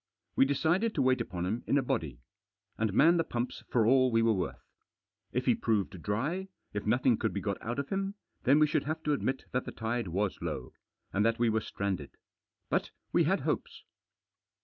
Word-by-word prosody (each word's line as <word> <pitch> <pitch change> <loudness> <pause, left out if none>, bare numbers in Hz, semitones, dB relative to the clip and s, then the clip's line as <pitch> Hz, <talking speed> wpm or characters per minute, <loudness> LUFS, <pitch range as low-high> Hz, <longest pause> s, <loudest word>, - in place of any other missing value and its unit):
We - - +6
decided 160 +11 +1
to 145 - +2
wait 130 -1 +3
upon 90 -5 -3
him 110 +6 -2
in 140 - +3
a 140 - +2
body. 70 - -2 0.5
And 110 -2 0
man 160 - +5
the 165 - +3
pumps 120 -4 -3
for 115 -3 +3
all 130 +2 +5
we 115 0 +3
were 115 -1 +4
worth. 95 -4 -3 0.7
If - - -1
he - - +5
proved 100 -5 -1
dry, 145 - -1 0.3
if 105 0 -3
nothing 120 +1 +3
could 110 - 0
be 100 - -1
got 100 -1 -3
out 120 +2 -3
of 140 0 -3
him, 195 +1 -2 0.3
then 140 +3 +5
we 155 - +6
should 150 - 0
have 155 +2 -3
to 150 - +2
admit 135 -1 -1
that 125 - -1
the - - -5
tide 115 -1 -2
was 95 +2 -1
low. - - -4 0.4
And 100 - +2
that 115 +1 +2
we 120 -1 +3
were 110 0 +1
stranded. 95 -9 -4 0.5
But - - 0 0.2
we - - +4
had - - +2
hopes. - - -3
120 Hz, 205 wpm, -31 LUFS, 105-140 Hz, 0.7 s, We